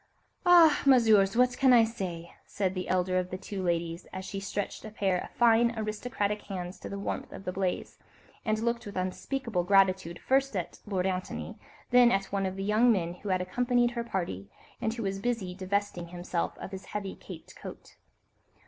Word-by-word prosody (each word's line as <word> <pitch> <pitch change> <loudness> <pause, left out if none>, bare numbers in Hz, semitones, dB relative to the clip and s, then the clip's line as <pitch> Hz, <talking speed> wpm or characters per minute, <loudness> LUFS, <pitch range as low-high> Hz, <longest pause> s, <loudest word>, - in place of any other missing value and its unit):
"Ah, 340 -4 +7
Messieurs! 225 -6 +5
what 250 0 +4
can 265 -2 +6
I 235 -2 +7
say?" 185 -7 -5
said 190 -2 -1
the 185 -1 -4
elder 185 0 +2
of 180 0 -3
the 185 - -4
two 195 +1 -6
ladies, 170 -1 -2
as 190 0 -6
she 195 - -5
stretched 195 +1 -4
a 215 - -7
pair 195 -4 0
of - - -9
fine, 235 0 +4
aristocratic 210 -1 -2
hands 180 -2 -6
to - - -7
the 200 - -5
warmth 200 - -4
of 195 - -9
the 180 - -1
blaze, 185 -1 -3 0.4
and 215 -1 +1
looked 235 0 -1
with 205 - -7
unspeakable 185 +2 -2
gratitude 190 -2 +3
first 270 +1 +1
at 175 -2 -4
Lord 190 -3 -1
Antony, 185 -1 -3 0.3
then 245 -1 +7
at 195 0 +1
one 195 -1 0
of 190 - -4
the 195 - -4
young 215 +4 +4
men 175 -5 0
who 205 - -5
had 185 -1 +1
accompanied 245 +4 +1
her 235 -1 -3
party, 170 - -4 0.3
and 220 - 0
who 230 0 -5
was 195 0 -2
busy 225 -5 -2
divesting 190 -1 -2
himself 175 0 -3
of - - -8
his 190 -1 -7
heavy, 200 -1 -4
caped - - -11
coat. - - -10
195 Hz, 195 wpm, -29 LUFS, 185-230 Hz, 0.4 s, Ah